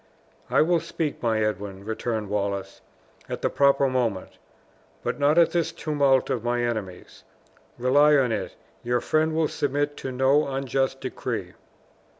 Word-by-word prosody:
"I - - +4
will 170 +1 +2
speak, 160 -2 -4
my 110 -2 +1
Edwin," 100 -2 -4
returned 110 -1 -3
Wallace, 100 -1 -3 0.5
"at - - -5
the - - +1
proper 140 0 +3
moment; 120 -7 -2 0.6
but - - -2
not 145 +3 +3
in 170 - +7
this 170 -2 0
tumult 140 -5 +1
of 120 -4 -2
my 120 0 0
enemies. 110 -7 -5 0.5
Rely 145 +5 +4
on 130 -4 +2
it, 110 - -3 0.3
your 120 0 0
friend 155 +4 +1
will 160 -1 +2
submit 145 +1 -1
to 130 - -5
no 135 +4 +3
unjust 135 0 -1
decree." - - -4
130 Hz, 150 wpm, -25 LUFS, 115-145 Hz, 0.6 s, in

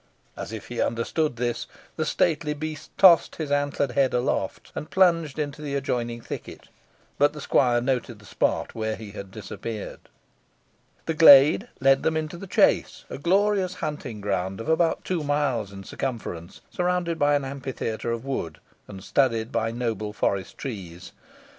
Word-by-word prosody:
As - - -6
if 110 -2 -8
he 120 -1 -2
understood 120 +4 -1
him, 120 0 0 0.4
the 155 - -1
stately 150 -1 +1
beast 155 0 -6
tossed 180 -3 +6
his 155 -3 -4
antlered 145 -1 0
head 135 0 +2
aloft, 125 +3 -2
and 150 - -6
plunged 165 -6 +3
into 150 -1 -3
the 145 -2 -3
adjoining 120 -3 -2
thicket; - - -8 0.5
but 145 +1 +4
the 150 - -8
squire 120 -4 +3
noted 125 -2 -1
the 105 - -17
spot - - -1
where 110 -1 -2
he 110 -2 -9
had 100 -1 -8
disappeared. 110 +1 -7 1.1
The 165 - -1
glade 155 - +8
led 135 +1 +4
them 160 0 +1
into 155 +2 -4
the 195 - -9
chase, - - +2
a - - -5
glorious 190 +2 +2
hunting 140 - -5
ground 95 -1 -2
of 115 - -6
about 160 +1 +2
two 175 -4 -1
miles 140 -8 0
in 95 0 -9
circumference, 95 -8 -5
surrounded 180 -2 -1
by 145 0 +4
an 140 -1 0
amphitheatre 130 -4 -4
of 115 +2 -4
wood, 135 -12 -3 0.3
and 95 -2 -10
studded 115 -3 +1
by 110 - 0
noble 115 -3 -3
forest 100 -2 -1
trees. 95 - -7
135 Hz, 160 wpm, -25 LUFS, 115-155 Hz, 1.1 s, glade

